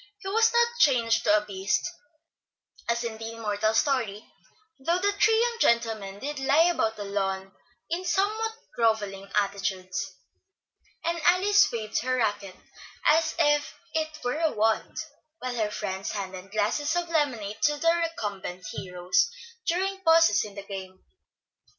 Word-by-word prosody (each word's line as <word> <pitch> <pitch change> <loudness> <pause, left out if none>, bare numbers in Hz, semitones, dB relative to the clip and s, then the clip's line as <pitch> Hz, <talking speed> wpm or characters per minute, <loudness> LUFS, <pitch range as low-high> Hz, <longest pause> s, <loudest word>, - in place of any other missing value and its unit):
He 400 -1 -9
was 450 +3 +4
not 475 0 +2
changed 235 -5 +3
to 210 0 +5
a 210 - -2
beast, 195 -1 -1 1.0
as 235 +1 +1
in 225 -2 -5
the 225 0 -6
immortal 215 -1 0
story, 230 -6 0 0.5
though 335 +6 +1
the 400 +2 +1
three 435 +2 +3
young 470 0 +1
gentlemen 225 - +1
did 290 +5 -5
lie 280 +4 +4
about 225 -10 0
the 210 - -6
lawn 195 -1 -2 0.4
in 340 +3 -2
somewhat 420 +5 0 0.2
grovelling 205 -4 0
attitudes; 195 -2 -2 0.9
and 340 0 -1
Alice 375 +5 +4
waved 220 -2 -2
her 255 +2 0
racquet 205 -5 -1 0.5
as 315 +1 +4
if 295 -3 +2 0.2
it 315 -1 -2
were 245 +5 -1
a 320 -2 +2
wand, 220 +1 0 0.4
while 255 -3 -4
her 220 -3 0
friends 190 -2 -4
handed 190 -2 -6
glasses 215 - 0
of 350 0 0
lemonade 250 -10 -1
to 295 -1 +3
the 330 +2 +3
recumbent 205 - -4
heroes 180 - 0 0.4
during 385 +3 0
pauses 330 0 +5
in 205 -2 -9
the 200 - -7
game. 190 -2 -8
230 Hz, 145 wpm, -27 LUFS, 200-330 Hz, 1.0 s, to